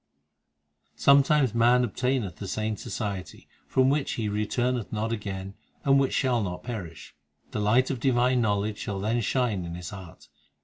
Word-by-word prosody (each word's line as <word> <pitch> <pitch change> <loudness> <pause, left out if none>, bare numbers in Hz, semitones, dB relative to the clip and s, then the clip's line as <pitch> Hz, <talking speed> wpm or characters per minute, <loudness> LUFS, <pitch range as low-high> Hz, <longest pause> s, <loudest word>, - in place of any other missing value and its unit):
8 - - -29
Sometimes 140 -2 +5
man 120 +2 +4
obtaineth 125 -4 -1
the 100 - -6
saints 110 +1 -2
society, 100 -5 -5 0.2
From 130 0 +3
which 145 -1 0
He 110 -2 -2
returneth 115 +3 -1
not 110 +1 -2
again, 95 -3 -5 0.3
And 135 0 +5
which 135 - +1
shall 125 -4 +2
not 90 -3 -4
perish: 90 - -7 0.4
The - - -3
light 120 +6 +3
of 130 - -3
divine 125 0 +2
knowledge 105 -1 0
shall 100 -2 -4
then 110 +4 0
shine 115 -5 0
in 85 0 -6
his 90 -3 -7
heart. 95 -4 -11
110 Hz, 165 wpm, -27 LUFS, 100-125 Hz, 0.4 s, Sometimes